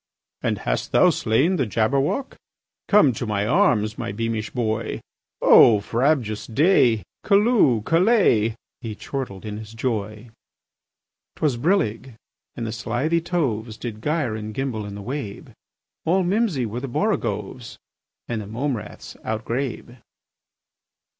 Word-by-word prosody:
"And - - 0
hast - - -3
thou - - +6
slain 140 +12 +1
the 135 - 0
Jabberwock? 135 - 0 0.5
Come 200 - +5
to 115 +1 -4
my 105 -1 0
arms, 115 - +2
my 120 -3 -3
beamish 110 0 -3
boy! 110 -3 -2 0.4
O 110 -3 +7
frabjous 115 0 0
day! 125 - +3 0.2
Callooh! 200 - +3
Callay!" 165 - +3 0.2
He 115 -4 -6
chortled 110 -6 -6
in 105 -1 -5
his 110 +1 -10
joy. 110 -1 -3 1.0
'Twas 150 -5 0
brillig, 130 - 0 0.4
and 115 - -4
the 110 - -3
slithy 125 +9 -1
toves 120 -11 -2
Did 110 -3 -6
gyre 150 -6 -1
and 110 0 -6
gimble 120 -6 -3
in 100 - -7
the 100 - -8
wabe: 125 -4 -6 0.5
All 185 +3 +2
mimsy 185 - +1
were 115 +2 -4
the 135 - -5
borogoves, - - -2 0.5
And 115 -2 -3
the 100 - -8
mome 125 +4 -2
raths 105 - -10
outgrabe. 120 +3 -4
120 Hz, 130 wpm, -23 LUFS, 110-150 Hz, 1.0 s, O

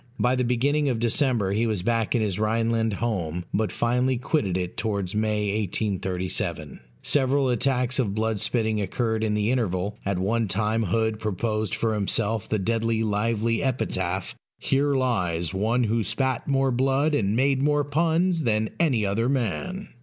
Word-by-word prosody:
By 125 +1 +2
the 125 - +1
beginning 140 +5 +1
of 125 - 0
December 120 -3 +1
he 110 +4 +1
was 105 -5 -2
back 115 +1 0
in 115 - +2
his 100 -2 -1
Rhineland 115 0 +1
home; 90 -6 -2
but 110 0 0
finally 125 +2 +1
quitted 115 - 0
it 90 -1 -4
towards 100 -4 -2
May, 105 -1 0
1837. 90 -5 -2 0.2
Several 135 -1 +2
attacks 125 +1 +1
of 105 -6 0
blood 110 -1 0
spitting 110 -1 0
occurred 110 +2 -1
in 105 -1 0
the 105 +2 +1
interval; 105 -4 -1
at 100 -2 -1
one 110 +4 0
time 105 +3 0
Hood 110 +3 0
proposed 110 -1 -1
for 115 -1 0
himself 105 +1 -1
the 110 - +1
deadly 115 +2 0
lively 110 +2 0
epitaph, 130 -2 -1 0.2
"Here 140 +1 +1
lies 90 -11 0
one 110 +6 +1
who 115 0 +1
spat 130 +5 -1
more 135 -1 +2
blood 135 +4 +1
and 105 -7 +1
made 135 +2 +2
more 145 +1 +2
puns 165 +4 +1
than 110 -4 0
any 130 -11 +2
other 115 +5 0
man." 140 - -2
115 Hz, 160 wpm, -25 LUFS, 105-130 Hz, 0.2 s, By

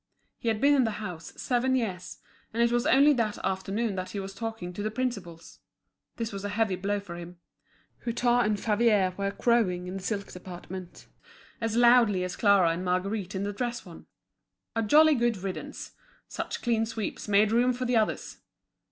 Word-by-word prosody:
He - - -6
had 220 -2 +1
been 285 +4 +5
in 275 -2 +4
the 220 -3 -2
house 165 -3 -7
seven 255 +1 +1
years, 195 -8 -3 0.3
and 230 +1 +1
it 235 - +2
was 240 0 +1
only 285 +3 +6
that 225 -5 -1
afternoon 195 +4 -1
that 185 0 -4
he 205 - -4
was 195 0 -6
talking 225 -5 -5
to 205 - -5
the 215 - -1
principals; 200 -9 -5 0.6
this 230 -1 -3
was 195 0 -5
a 205 - -2
heavy 205 -2 +1
blow 200 +3 -1
for 180 -4 -9
him. 175 +1 -9 0.7
Hutin 240 +1 +2
and 210 -1 0
Favier 210 -4 +2
were 200 0 -1
crowing 200 -4 +1
in 185 +1 -5
the - - -7
silk 200 0 -3
department, 180 0 -9 0.6
as 225 -1 -1
loudly 235 -6 +5
as 180 0 -4
Clara 200 -5 +4
and 170 +2 -3
Marguerite 185 +2 -1
in 190 - -2
the 205 0 -3
dress 240 +2 -3
one. - - -13 0.7
A 225 - +1
jolly 305 +8 +6
good 240 -4 +1
riddance! 190 0 -6 0.4
Such - - -5
clean 225 -2 +1
sweeps 225 -2 -5
make 210 +1 +4
room 245 +2 +3
for 250 +1 -3
the 245 -1 +2
others! 215 -1 -1
210 Hz, 185 wpm, -28 LUFS, 190-235 Hz, 0.7 s, only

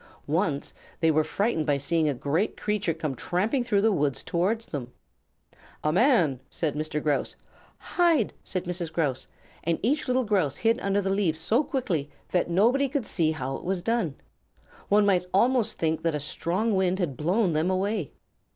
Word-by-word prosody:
Once 155 -2 -1 0.3
they 165 -1 +4
were 155 0 +3
frightened 165 -1 -1
by 145 -1 +3
seeing 160 +2 +1
a - - +1
great 155 - -1
creature 210 -4 -1
come 155 -3 -3
tramping 200 - 0
through 205 -4 +1
the 220 - +4
woods 145 -7 0
towards 205 +7 0
them. 125 -5 -6 0.9
"A 155 - +1
man!" 180 - +3
said 155 -4 -2
Mr. 155 0 -2
Grouse. 150 -2 0 0.4
"Hide!" 335 - +2
said 185 -2 -2
Mrs. 175 -2 -3
Grouse, 145 -6 -1 0.4
and 170 0 +1
each 280 +7 +1
little 255 0 +2
Grouse 185 - +1
hid 230 +2 +2
under 200 -2 0
the 195 - 0
leaves 185 -5 +1
so 225 - +2
quickly 240 - -2 0.2
that 180 -1 +1
nobody 240 +10 +3
could 275 -4 -2
see 165 -6 +1
how 135 -4 -3
it - - -12
was 185 -1 -2
done. 225 - 0 0.7
One 205 +1 +5
might 185 -3 +3
almost 240 +2 +2
think 160 -1 0
that 165 -2 0
a - - -1
strong 180 +9 -1
wind 190 -1 +2
had 170 -8 -2
blown 180 - +1
them 155 +4 +1
away. 190 - -1
180 Hz, 180 wpm, -26 LUFS, 155-215 Hz, 0.9 s, One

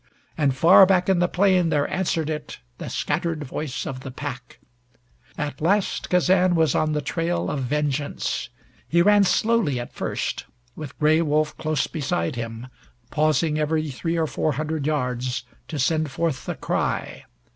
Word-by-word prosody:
And 140 -4 +1
far 180 +7 +7
back 185 -1 +2
in 190 -2 +3
the 175 - +3
plain 185 -2 +3
there 145 -2 +1
answered 170 -4 -1
it 155 -1 -5 0.2
the - - -5
scattered 155 +1 -2
voice 145 0 -4
of 130 - -5
the 135 - -8
pack. 130 -2 -7 0.8
At 145 -2 -4
last 195 +5 +1
Kazan 180 0 +3
was 160 -2 +3
on 155 0 +1
the 150 -1 -1
trail 165 +4 -1
of 145 - -2
vengeance. 145 +2 -2 0.4
He 170 +1 +4
ran 205 +1 +5
slowly 215 - +2
at 120 - -7
first, - - -3 0.3
with 155 -4 -8
Gray 155 +1 +3
Wolf 155 -1 +1
close 155 -2 -1
beside 135 - -2
him, 115 0 -5 0.5
pausing 155 0 +1
every 155 0 0
three 165 +6 -2
or 165 - +2
four 155 0 -1
hundred 155 +1 -2
yards 125 -4 -1 0.2
to 155 - -5
send 155 +3 +1
forth 140 -1 -2
the - - -2
cry. - - -2
155 Hz, 160 wpm, -24 LUFS, 140-170 Hz, 0.8 s, far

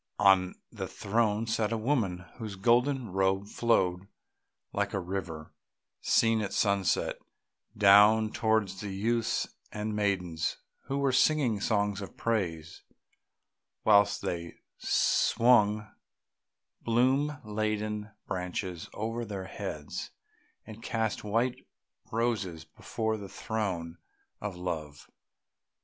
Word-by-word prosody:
On 95 -2 +4 0.2
the - - -5
throne 110 +1 0
sat 110 -1 0
a 115 - 0
woman 110 -7 0
whose 110 -3 -5
golden 120 +3 +2
robe 95 +1 +1
flowed, 95 -5 +1 0.7
like 100 +1 -1
a - - 0
river 90 -4 -5 0.5
seen 115 -1 +3
at 100 -2 -3
sunset, 100 -3 +1 0.6
down 105 +2 +6
towards 110 -5 0
the 105 - -4
youths 110 +4 0 0.2
and 105 0 -3
maidens 90 -6 -1 0.3
who 135 - -2
were 140 -1 +2
singing 130 -5 +3
songs 100 -2 0
of 100 - -9
praise, 85 -8 -2 1.0
whilst 100 -1 +4
they 85 -1 -4 0.2
swung 110 -3 +3 0.9
bloom 130 +5 +2
laden 105 0 -2 0.2
branches 90 -1 -4
over 115 +3 -3
their 100 -4 -5
heads 95 - -6 0.6
and 110 0 -10
cast 110 -2 -2
white 115 +4 -1 0.4
roses 105 -8 -1
before 110 +7 -3
the 100 -2 -8
throne 90 -8 -3 0.4
of 105 -3 -4
Love. 80 -5 -5
105 Hz, 105 wpm, -30 LUFS, 95-115 Hz, 1.0 s, down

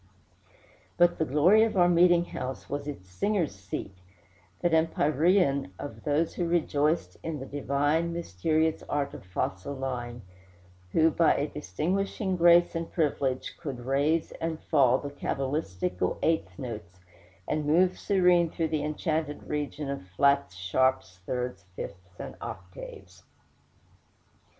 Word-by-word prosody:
But 175 0 +4
the 160 - +2
glory 165 +10 +5
of 220 -2 +2
our 175 -1 +6
meeting 175 0 +5
house 130 -5 -6
was 145 +1 -4
its 135 -11 -7
singers' 170 - 0
seat 95 0 -6 0.7
that 175 -1 +1
empyrean 155 - +2
of 145 - -8
those 150 +2 +1
who 175 - -1
rejoiced 160 -1 +1
in 160 -2 -4
the 135 - -6
divine, 145 +4 0
mysterious 160 - 0
art 140 -1 -1
of - - -9
fa 90 -1 -1
sol 95 +10 -7
la 130 -2 -3
ing, 120 0 -9 0.7
who, 160 0 +4
by 165 +1 +4
a 145 - 0
distinguishing 185 - -2
grace 175 0 +5
and 165 -1 -4
privilege, 140 -5 -1
could 135 -7 -6
"raise 145 +5 +1
and 165 -1 -2
fall" 130 -5 +3
the 145 +1 -6
cabalistical 100 - -2
eighth 95 - 0
notes, 90 -7 -7 0.5
and 150 -1 -1
move 180 +4 +3
serene 180 -3 +3
through 160 0 -2
the 155 -2 -1
enchanted 155 0 -2
region 150 0 -3
of 140 -10 -5
flats, 140 -5 +3
sharps, 95 0 0
thirds, 125 -7 -3
fifths, 90 -2 -9
and - - -6
octaves. 90 0 -9
145 Hz, 135 wpm, -28 LUFS, 130-165 Hz, 0.7 s, our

